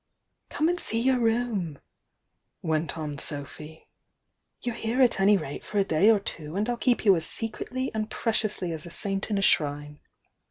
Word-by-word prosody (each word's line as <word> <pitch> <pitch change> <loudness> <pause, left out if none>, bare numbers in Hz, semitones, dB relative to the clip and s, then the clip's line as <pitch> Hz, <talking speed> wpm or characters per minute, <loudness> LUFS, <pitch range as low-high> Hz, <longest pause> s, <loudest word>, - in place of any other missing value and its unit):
^ - - -49
''Come 310 - +3
and 355 +1 0
see 225 - -1
your 255 +1 +2
room," 225 -9 0 0.9
went 160 -1 -1
on 150 -3 -4
Sophy. 150 +2 -6 0.8
"You're 245 - -1
here 230 +2 -2
at 240 -5 +3
any 200 +1 +5
rate 145 -5 -6
for 210 - -5
a 200 - +5
day 180 +3 +3
or 220 -2 +5
two, 160 -4 -5
and 210 +3 0
I'll 245 - 0
keep 240 -1 +1
you 195 -2 +7
as 160 -2 -1
secretly 250 +3 -3
and 220 0 -2
preciously 215 -7 -1
as 160 +1 -6
a - - -8
saint 195 +4 -3
in 210 - 0
a 195 - 0
shrine. 145 -3 +1
200 Hz, 190 wpm, -27 LUFS, 160-225 Hz, 0.9 s, you